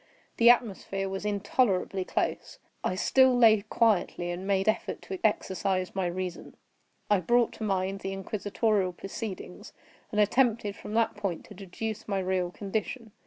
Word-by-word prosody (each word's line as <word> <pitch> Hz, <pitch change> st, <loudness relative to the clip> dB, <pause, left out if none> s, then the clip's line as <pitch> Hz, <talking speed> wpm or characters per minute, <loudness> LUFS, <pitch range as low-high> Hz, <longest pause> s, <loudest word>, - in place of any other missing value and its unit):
The 235 Hz, 0 st, +7 dB
atmosphere 195 Hz, -5 st, +2 dB
was 195 Hz, +2 st, -4 dB
intolerably 200 Hz, -2 st, +1 dB
close. -, -, -2 dB, 0.3 s
I 185 Hz, -, 0 dB
still 260 Hz, +6 st, +4 dB
lay 220 Hz, -3 st, +6 dB
quietly, 205 Hz, -5 st, +1 dB
and 180 Hz, +2 st, -5 dB
made 195 Hz, 0 st, +1 dB
effort 215 Hz, +1 st, 0 dB
to 190 Hz, -1 st, -6 dB
exercise 190 Hz, -3 st, 0 dB
my 190 Hz, -2 st, 0 dB
reason. 180 Hz, 0 st, -5 dB, 0.5 s
I 205 Hz, -2 st, +3 dB
brought 240 Hz, +6 st, +2 dB
to -, -, -6 dB
mind 195 Hz, -1 st, -1 dB
the 195 Hz, -, -4 dB
inquisitorial 200 Hz, 0 st, -1 dB
proceedings, 195 Hz, 0 st, -7 dB, 0.4 s
and 210 Hz, -, -1 dB
attempted 215 Hz, -1 st, +2 dB
from 210 Hz, -, -7 dB
that 230 Hz, 0 st, +2 dB
point 200 Hz, -5 st, -3 dB
to -, -, -12 dB
deduce 210 Hz, +3 st, -6 dB
my 200 Hz, -2 st, -1 dB
real 185 Hz, -1 st, 0 dB
condition. 215 Hz, +5 st, -4 dB
200 Hz, 150 wpm, -28 LUFS, 190-220 Hz, 0.5 s, The